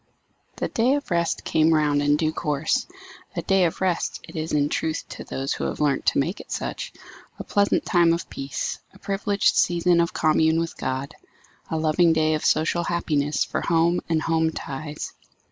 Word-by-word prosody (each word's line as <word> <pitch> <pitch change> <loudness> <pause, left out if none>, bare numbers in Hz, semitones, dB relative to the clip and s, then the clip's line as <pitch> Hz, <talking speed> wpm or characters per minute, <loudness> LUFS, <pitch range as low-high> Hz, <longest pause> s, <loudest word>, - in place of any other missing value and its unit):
The - - -2
day 245 +4 +2
of 285 -8 -5
rest 170 -1 0
came 160 +1 +3
round 150 -2 +2
in 145 0 +3
due 155 0 0
course. 150 -2 0 0.5
A - - -2
day 195 -2 +3
of 165 - -2
rest 185 -3 0
it - - -12
is 160 0 -3
in 145 -1 +2
truth 160 +1 -2
to - - -7
those 135 +1 -3
who - - -3
have - - -3
learnt 145 -3 +1
to - - +3
make 165 +8 0
it - - -11
such; - - -4 0.5
a - - -6
pleasant 205 0 +1
time 170 -3 +4
of 170 0 -1
peace; 135 0 -4 0.2
a - - -13
privileged 200 +1 +1
season 175 0 +3
of 170 - 0
commune 160 +1 +3
with 165 0 -3
God; 130 +3 -3 0.6
a 160 - -1
loving 160 +2 +3
day 155 0 +2
of 155 - -2
social 165 +2 +2
happiness 150 -4 0
for - - -3
home 170 +1 +2
and 160 -1 +1
home 160 0 +2
ties. 150 0 -6
160 Hz, 190 wpm, -24 LUFS, 150-170 Hz, 0.6 s, time